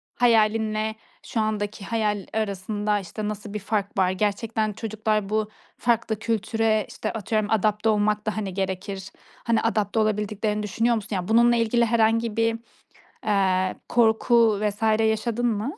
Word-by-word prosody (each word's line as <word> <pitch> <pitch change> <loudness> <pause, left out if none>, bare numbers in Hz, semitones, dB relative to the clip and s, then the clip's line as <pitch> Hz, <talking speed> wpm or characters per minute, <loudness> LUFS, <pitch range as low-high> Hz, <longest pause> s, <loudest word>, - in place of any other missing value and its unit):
hayalin 220 -2 +3
ile 215 0 -2 0.3
şu 225 - -3
andaki 210 -2 -2
hayal 210 -4 -1
arasında, 210 0 -1
işte, 210 +3 -5
nasıl 210 0 -6
bir 210 - -3
fark 200 0 -2
var? 185 -1 +3
Gerçekten 215 +2 -1
çocuklar 215 -1 -2
bu 215 0 0 0.3
farklı 230 -2 0
kültüre, 220 -1 0
işte, 215 - -4
atıyorum 215 0 -1
adapte 215 0 +2
olmak 210 0 +1
da, 215 0 -2
hani, 195 -4 -3
gerekir. 190 0 -4 0.3
Hani, 230 -1 +2
adapte 220 -1 0
olabildiklerini 210 0 0
düşünüyor 230 +3 +1
musun? 205 -1 -4
Ya, 180 0 -3
bununla 235 +2 +5
ilgili 235 +1 +2
herhangi 230 0 +1
bir, 230 0 +1 0.7
eee, 190 -3 +2
korku 225 -2 +3
vs. 210 0 -2 0.2
yaşadın 225 +2 0
mı? 235 - -2
215 Hz, 145 wpm, -24 LUFS, 205-225 Hz, 0.7 s, bununla